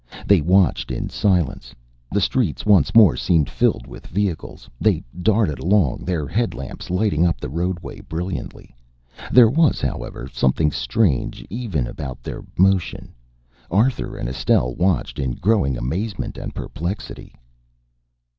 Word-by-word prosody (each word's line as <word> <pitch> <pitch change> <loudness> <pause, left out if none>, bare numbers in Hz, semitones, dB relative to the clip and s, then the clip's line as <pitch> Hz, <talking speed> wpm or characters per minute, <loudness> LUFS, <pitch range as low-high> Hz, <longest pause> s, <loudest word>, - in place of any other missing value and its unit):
They 100 -5 +5
watched 85 -7 +2
in - - -3
silence. 90 -11 0 0.4
The 100 - +1
streets 100 - 0
once 100 -7 +4
more 105 - +7
seemed 75 +4 +2
filled - - +1
with - - -11
vehicles. 95 -3 -3
They - - +2 0.2
darted 100 -5 +2
along, 90 -6 +1
their 85 -5 -1
headlamps 105 - -3
lighting 90 -3 +1
up 85 -7 +1
the - - -5
roadway 85 +2 -3
brilliantly. 85 -3 -6 0.6
There 125 -2 +8
was, 155 +6 +3
however, - - -4
something 70 +3 +1
strange 65 - 0
even 100 - -2
about 65 +1 -7
their - - -6
motion. 95 -1 +1 0.6
Arthur 115 - +1
and - - -4
Estelle 60 -1 +1
watched 85 -6 0
in 65 -3 -1
growing 90 - +1
amazement 90 - -3
and - - -7
perplexity. 90 +6 -6
90 Hz, 130 wpm, -21 LUFS, 70-105 Hz, 0.6 s, There